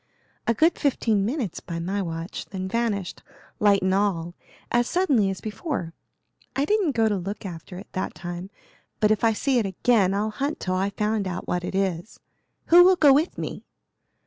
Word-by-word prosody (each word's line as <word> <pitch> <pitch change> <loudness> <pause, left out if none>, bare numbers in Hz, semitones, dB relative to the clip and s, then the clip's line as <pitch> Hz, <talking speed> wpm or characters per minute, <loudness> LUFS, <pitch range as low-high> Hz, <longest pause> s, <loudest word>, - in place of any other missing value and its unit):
"A 230 - +3
good 325 +8 +3
fifteen 225 -8 +1
minutes 235 - -2
by 170 - -6
my 190 +4 -2
watch, 165 -1 -5
then 190 -1 -5
vanished, 205 -3 -2 0.4
light 200 -2 +4
and 190 0 +2
all, 185 -4 0 0.4
as 240 0 +2
suddenly 280 - +2
as 190 - -5
before. 215 - -4 0.6
I 275 - +1
didn't 400 -5 +1
go 225 -2 +3
to 210 - +1
look 195 +3 -5
after 180 0 -8
it 195 - -8
that 185 - -3
time, 175 +3 -6 0.5
but 210 0 +3
if 215 - +1
I 225 -1 +4
see 260 +3 +1
it 220 - 0
again 195 0 +2
I'll 215 +2 0
hunt 280 +7 -3
till 185 - -2
I 190 +2 +1
find 210 0 -1
out 180 -1 -5
what 180 0 -1
it 185 - -4
is. 190 0 -2 0.5
Who 350 +1 +9
will 370 +1 +6
go 295 -6 +6
with 305 +5 +1
me?" - - -5
205 Hz, 190 wpm, -25 LUFS, 185-240 Hz, 0.6 s, Who